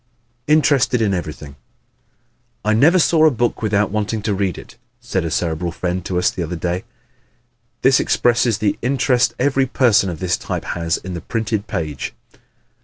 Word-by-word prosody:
Interested 140 Hz, -5 st, +3 dB
in 105 Hz, -3 st, +1 dB
Everything 75 Hz, -5 st, -5 dB
¶ -, -, -18 dB, 1.1 s
"I 110 Hz, -, +3 dB
never 150 Hz, +11 st, +5 dB
saw 160 Hz, -2 st, +4 dB
a -, -, +6 dB
book 120 Hz, -3 st, -1 dB
without 105 Hz, -2 st, +1 dB
wanting 105 Hz, 0 st, -2 dB
to 105 Hz, -, 0 dB
read 95 Hz, -2 st, -1 dB
it," -, -, -12 dB, 0.2 s
said 115 Hz, -6 st, -2 dB
a 85 Hz, -, -2 dB
Cerebral 85 Hz, +1 st, -1 dB
friend 90 Hz, +1 st, -3 dB
to 90 Hz, -, -2 dB
us 90 Hz, -, +2 dB
the 95 Hz, -, -5 dB
other 85 Hz, +1 st, -3 dB
day. 90 Hz, +2 st, -3 dB, 1.0 s
This 135 Hz, +1 st, +5 dB
expresses 120 Hz, -2 st, +2 dB
the 105 Hz, -2 st, -1 dB
interest 125 Hz, -1 st, +1 dB
every 135 Hz, 0 st, +1 dB
person 120 Hz, -7 st, +3 dB
of 85 Hz, -3 st, -6 dB
this 90 Hz, -1 st, 0 dB
type -, -, -5 dB
has 85 Hz, -1 st, -1 dB
in 95 Hz, -, -8 dB
the 85 Hz, -, -5 dB
printed 110 Hz, -2 st, -2 dB
page. 75 Hz, -5 st, -4 dB
105 Hz, 175 wpm, -19 LUFS, 90-125 Hz, 1.1 s, a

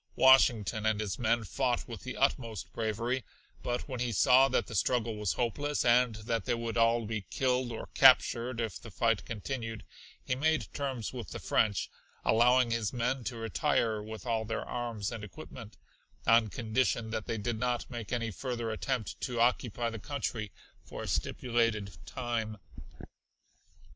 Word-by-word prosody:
Washington 110 Hz, -5 st, +5 dB
and 110 Hz, -1 st, +1 dB
his 105 Hz, -3 st, -3 dB
men 115 Hz, 0 st, +2 dB
fought 125 Hz, +3 st, -1 dB
with 115 Hz, -2 st, -7 dB
the 130 Hz, -, -6 dB
utmost 115 Hz, -, -1 dB
bravery, 115 Hz, +3 st, -1 dB, 0.4 s
but 120 Hz, 0 st, -2 dB
when 130 Hz, -3 st, -5 dB
he 120 Hz, -1 st, 0 dB
saw 130 Hz, +5 st, +6 dB
that 130 Hz, -, +1 dB
the -, -, -9 dB
struggle 115 Hz, +2 st, +1 dB
was 105 Hz, -3 st, -1 dB
hopeless 145 Hz, +5 st, -1 dB
and 120 Hz, -1 st, +4 dB
that 110 Hz, +1 st, -2 dB
they 120 Hz, -, +1 dB
would 115 Hz, -1 st, -4 dB
all 115 Hz, 0 st, +3 dB
be 110 Hz, 0 st, -3 dB
killed 125 Hz, -1 st, 0 dB
or 115 Hz, -, -5 dB
captured 125 Hz, -2 st, +5 dB
if 115 Hz, -4 st, -3 dB
the 115 Hz, -, -10 dB
fight 110 Hz, -2 st, +1 dB
continued, 115 Hz, +1 st, -5 dB, 0.4 s
he -, -, 0 dB
made 155 Hz, +4 st, 0 dB
terms 130 Hz, -6 st, -3 dB
with 120 Hz, -3 st, -6 dB
the -, -, -6 dB
French, 105 Hz, -4 st, +1 dB, 0.4 s
allowing 120 Hz, +2 st, +4 dB
his 115 Hz, -3 st, 0 dB
men 125 Hz, +1 st, -1 dB
to 125 Hz, -, -3 dB
retire 115 Hz, 0 st, 0 dB
with 110 Hz, +2 st, -8 dB
all 115 Hz, -2 st, 0 dB
their 115 Hz, +1 st, -3 dB
arms 120 Hz, -4 st, -3 dB
and 115 Hz, -3 st, -6 dB
equipment, 115 Hz, 0 st, -10 dB, 0.5 s
on 115 Hz, 0 st, +5 dB
condition 115 Hz, +1 st, 0 dB
that 110 Hz, -2 st, -3 dB
they 115 Hz, -, -1 dB
did 110 Hz, +1 st, -2 dB
not 125 Hz, 0 st, -1 dB
make 120 Hz, -4 st, -7 dB
any 115 Hz, -2 st, -1 dB
further 120 Hz, +1 st, -3 dB
attempt 115 Hz, 0 st, -3 dB
to 120 Hz, -2 st, -2 dB
occupy 120 Hz, -1 st, +1 dB
the 115 Hz, -, -6 dB
country 110 Hz, -5 st, -3 dB, 0.3 s
for -, -, -7 dB
a -, -, -5 dB
stipulated 115 Hz, -5 st, 0 dB
time. 115 Hz, -3 st, -3 dB
115 Hz, 165 wpm, -31 LUFS, 110-125 Hz, 0.5 s, saw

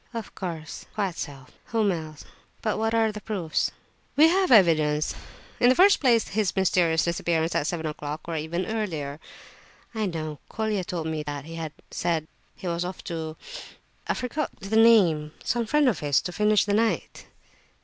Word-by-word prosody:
"Of 225 Hz, -2 st, -5 dB
course—quite 175 Hz, +2 st, -5 dB
so, 140 Hz, -5 st, -7 dB, 0.2 s
whom 220 Hz, -3 st, +1 dB
else? 155 Hz, -3 st, -6 dB, 0.4 s
But 215 Hz, -1 st, 0 dB
what 225 Hz, +1 st, +1 dB
are 225 Hz, -1 st, +3 dB
the 210 Hz, 0 st, -8 dB
proofs?" 185 Hz, -8 st, -1 dB, 0.5 s
"We 310 Hz, +3 st, +7 dB
have 375 Hz, -1 st, +2 dB
evidence. 155 Hz, -8 st, +4 dB, 0.5 s
In 245 Hz, -, +5 dB
the 255 Hz, -, +5 dB
first 395 Hz, +3 st, +6 dB
place, 235 Hz, -5 st, +3 dB
his 205 Hz, -2 st, 0 dB
mysterious 175 Hz, -4 st, +3 dB
disappearance 170 Hz, -1 st, 0 dB
at 145 Hz, -, 0 dB
seven 165 Hz, -2 st, -2 dB
o'clock, 150 Hz, 0 st, -4 dB
or 165 Hz, -, -3 dB
even 165 Hz, +4 st, -2 dB
earlier." 160 Hz, -10 st, -3 dB, 0.7 s
"I 220 Hz, -2 st, -1 dB
know, 155 Hz, -4 st, -4 dB
Colia 215 Hz, -3 st, -1 dB
told 175 Hz, -3 st, -4 dB
me 160 Hz, -1 st, -2 dB
that 145 Hz, -2 st, -5 dB
he 165 Hz, -, -9 dB
had 160 Hz, -2 st, -5 dB, 0.2 s
said 165 Hz, -3 st, -1 dB, 0.3 s
he -, -, -11 dB
was 170 Hz, 0 st, -1 dB
off 180 Hz, +1 st, -6 dB
to—I 160 Hz, -1 st, -7 dB
forget 265 Hz, +4 st, -2 dB
the 195 Hz, +3 st, -3 dB
name, 185 Hz, -10 st, +5 dB
some 235 Hz, -1 st, 0 dB
friend 295 Hz, +3 st, +3 dB
of 220 Hz, -10 st, +2 dB
his, 145 Hz, -2 st, +2 dB
to 180 Hz, -, -4 dB
finish 210 Hz, +2 st, +3 dB
the 205 Hz, -, 0 dB
night." 225 Hz, +1 st, 0 dB
180 Hz, 170 wpm, -26 LUFS, 160-220 Hz, 0.7 s, We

